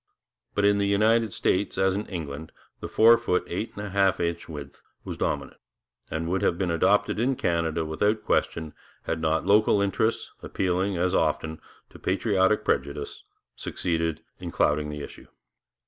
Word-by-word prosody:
But 100 - +2
in 100 0 +4
the 100 - +1
United 110 +2 +3
States, 95 +2 0
as 95 0 +3
in 100 +2 -3
England, 80 -3 -6 0.3
the - - -5
four 115 +1 +6
foot 105 -6 0
eight 95 +6 -4
and 105 - -5
a 100 - -6
half 95 -1 +2
inch 85 0 -2
width 70 -3 -9 0.2
was - - -5
dominant, - - -3 0.5
and 80 +1 -3
would 90 +1 0
have 85 - +1
been 90 -2 0
adopted 105 +6 +2
in 130 +3 +2
Canada 85 -4 0
without 105 +8 0
question, 80 -2 0 0.3
had 80 - -2
not 80 +1 +1
local 105 +1 +4
interests, 100 +3 0
appealing, 95 +1 -1
as 90 +1 +1
often, 80 -1 0 0.3
to - - -13
patriotic 100 +2 +1
prejudice, 70 +1 -2 0.3
succeeded 80 -3 -2 0.2
in - - -5
clouding 75 0 +1
the 75 -1 -5
issue. - - -11
90 Hz, 165 wpm, -26 LUFS, 80-100 Hz, 0.5 s, four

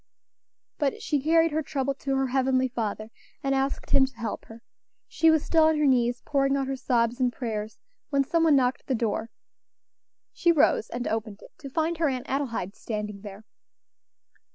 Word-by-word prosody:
But 285 -3 0
she 295 -3 0
carried 325 +2 +3
her 310 +1 0
trouble 275 -2 -2
to 275 0 -3
her 270 0 +1
Heavenly 260 0 +2
Father, 220 -2 -4 0.3
and 275 0 +1
asked 270 +1 -2
Him 265 -1 +5
to 265 - -15
help 225 -2 -5
her. 225 +1 -13 0.4
She 325 - +3
was 315 -1 +3
still 320 -2 +4
on 315 0 +3
her 300 - +2
knees, 245 -2 +2
pouring 275 -1 +1
out 270 - -1
her 270 0 -2
sobs 240 -1 0
and 250 -1 +2
prayers, 220 -3 -5 0.3
when 280 -2 +2
some 330 +4 +1
one 310 -3 +5
knocked 255 -1 +2
at - - -48
the 265 - +1
door. 225 0 -2 1.0
She 345 - +3
rose 290 -7 +3
and 245 +1 -4
opened 220 -2 -4
it - - -15
to 275 - -8
find 320 +3 -1
her 320 -3 +2
Aunt 255 -2 -3
Adelaide 235 -8 -2
standing 210 -2 -5
there. 205 +1 -10
265 Hz, 190 wpm, -26 LUFS, 230-285 Hz, 1.0 s, Him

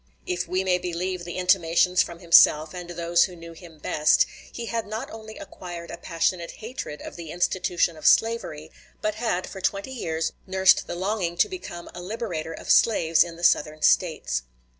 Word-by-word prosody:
If 175 -1 -2
we 185 +2 0
may 180 -1 +2
believe 180 +1 -3
the 175 - -6
intimations 180 -1 +3
from 170 - -4
himself 160 -2 +6
and 180 -1 -7
those 170 0 +2
who 180 - -9
knew 170 0 -11
him 165 -1 -14
best, 150 0 +3 0.3
he 235 - -6
had 230 -1 -3
not 220 +6 -5
only 220 0 -10
acquired 175 -3 -9
a - - -6
passionate 170 +1 -1
hatred 220 - -7
of - - -9
the 165 -2 -8
institution 175 0 0
of 155 - -2
slavery, 190 -9 +2 0.3
but 215 - -1
had 215 -5 -1
for 190 - -9
twenty 200 +7 -1
years 165 -10 -2 0.2
nursed 190 0 +4
the - - -4
longing 185 -2 -2
to 180 - +4
become 175 - -8
a 175 - -8
liberator 180 -5 -4
of - - -3
slaves 165 -8 +4
in 170 -1 -9
the 170 - -12
Southern 155 -2 +2
States. - - +2
175 Hz, 185 wpm, -25 LUFS, 170-190 Hz, 0.3 s, himself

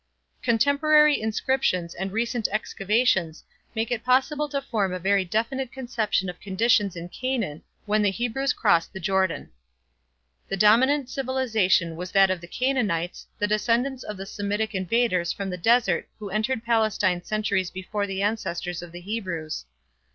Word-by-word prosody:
Contemporary 285 +5 +4
inscriptions 220 -6 0
and 190 +2 -4
recent 230 +1 0
excavations 200 -5 0 0.3
make 225 +1 -1
it 235 -2 -1
possible 270 +4 +2
to 280 - -1
form 215 -8 -1
a - - -2
very 195 +2 +2
definite 235 +7 -2
conception 235 -7 -1
of 180 -1 -6
conditions 205 -1 +2
in 170 0 -6
Canaan 230 - -3 0.2
when 210 0 +2
the 205 - +3
Hebrews 245 +6 -1
crossed 170 -7 +2
the 190 - -6
Jordan. 190 0 0 1.0
The 195 - -3
dominant 255 +7 +4
civilization 225 -11 +1
was 180 +2 -6
that 195 -1 +5
of 185 -2 -2
the 175 - -10
Canaanites, 205 -8 -1
the 205 - +1
descendants 235 +5 0
of 210 -4 -6
the 195 - -6
Semitic 205 +2 -2
invaders 185 -2 +1
from 195 -1 -4
the - - -3
desert 225 -2 +2
who 205 -2 -7
entered 220 +4 -1
Palestine 215 -6 +2
centuries 205 -4 -1
before 200 +2 -3
the 195 0 -2
ancestors 180 -5 -2
of 175 -1 -10
the 175 +1 -9
Hebrews. 180 - -4
210 Hz, 150 wpm, -25 LUFS, 185-240 Hz, 1.0 s, that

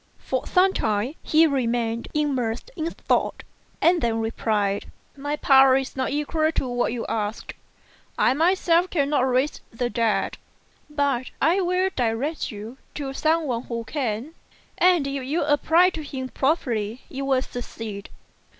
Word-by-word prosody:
For 260 - -3
some 375 +1 +4
time 215 +5 0
he 315 +1 +4
remained 235 -5 0
immersed 265 - -1
in 325 -1 -2
thought, - - -1 0.4
and 340 0 +4
then 230 -1 +1
replied, 215 -3 -1 0.2
"My 290 +1 -3
power 270 -2 +6
is 270 0 -4
not 260 -1 -1
equal 310 +2 0
to 265 - -1
what 245 -1 0
you 235 -1 -3
ask. 215 0 -3 0.6
I - - +4
myself 345 +3 +3
cannot 285 -4 +1
raise 260 +4 0
the 240 +1 -2
dead; 230 -3 0 0.5
but 280 -4 0
I 340 +7 +3
will 365 +1 +1
direct 250 +6 -1
you 220 +5 -9 0.2
to 275 -2 -4
some 320 +3 +1
one 245 -3 -2
who 230 -1 -4
can, 255 +1 -3 0.5
and 355 -5 +4
if 275 -1 -3
you 295 +6 0
apply 320 +5 +4
to 320 - -6
him 265 -3 -5
properly 245 -7 -1
you 270 +1 -5
will 265 -1 +2
succeed." 225 -5 -7
270 Hz, 150 wpm, -24 LUFS, 235-310 Hz, 0.6 s, power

